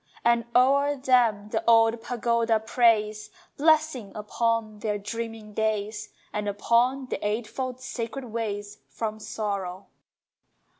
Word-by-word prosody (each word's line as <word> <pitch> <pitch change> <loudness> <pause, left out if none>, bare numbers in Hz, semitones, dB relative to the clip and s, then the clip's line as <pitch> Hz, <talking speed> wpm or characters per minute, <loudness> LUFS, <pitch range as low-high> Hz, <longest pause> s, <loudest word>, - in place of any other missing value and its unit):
And 235 0 +3
o'er 280 +3 +4
them 240 -6 +2
the - - -1
old 225 0 +5
pagoda 235 -1 +1
prays 215 -2 +2 0.3
Blessing 310 -7 +2
upon 215 0 -1
their 210 -1 -1
dreaming 225 0 -6
days, 215 0 -2 0.2
And 210 0 -2
upon 240 +6 +2
the - - -5
eightfold 235 +4 -3
sacred 255 +1 -5
ways 210 -3 -4
From 220 -1 -4
Sorrow! 200 -4 -4
225 Hz, 110 wpm, -26 LUFS, 210-240 Hz, 0.3 s, old